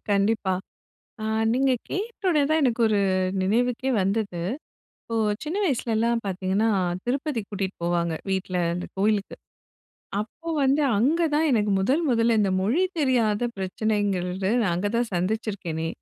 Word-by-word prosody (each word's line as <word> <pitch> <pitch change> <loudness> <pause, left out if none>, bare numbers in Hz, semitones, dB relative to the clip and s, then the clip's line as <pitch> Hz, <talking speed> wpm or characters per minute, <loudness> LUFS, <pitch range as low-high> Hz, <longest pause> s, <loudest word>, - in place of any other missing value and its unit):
கண்டிப்பா, 200 -1 +2 0.7
அ - - -3 0.3
நீங்க 265 +2 +3 0.2
கேட்டோனே 385 -5 0
தான் 315 +1 +3
எனக்கு 245 -3 +1
ஒரு 210 -2 +2 0.4
நினைவுக்கே 245 +6 +1
வந்தது. 200 -2 -1 0.6
இப்போ 230 - -5 0.3
சின்ன 310 +5 -3
வயசுலலாம் 235 - 0
பாத்தீங்கன்னா, 190 +3 0 0.4
திருப்பதிக்கு 255 -4 -2
கூட்டிட்டு 195 -1 -3
போவாங்க 170 -1 0 0.2
வீட்ல, 190 -1 -1 0.2
அந்த 180 +1 -4
கோயிலுக்கு. 205 0 +1 0.9
அப்போ 325 +10 -8
வந்து 275 +3 +3 0.2
அங்க 300 +10 +2
தான் 310 +1 +3
எனக்கு 210 -4 +2
முதல் 260 - +2
முதல்ல 230 -1 +3
இந்த 200 -2 +2
மொழி 230 - +2 0.2
தெரியாத 240 -6 +2
பிரச்சனைங்கறது, 190 -2 -1
நான் 200 -6 +1
அங்க 195 +4 0
தான் 235 -1 0
சந்திச்சிருக்கேனே! 180 -4 -2
220 Hz, 125 wpm, -25 LUFS, 190-255 Hz, 0.9 s, நீங்க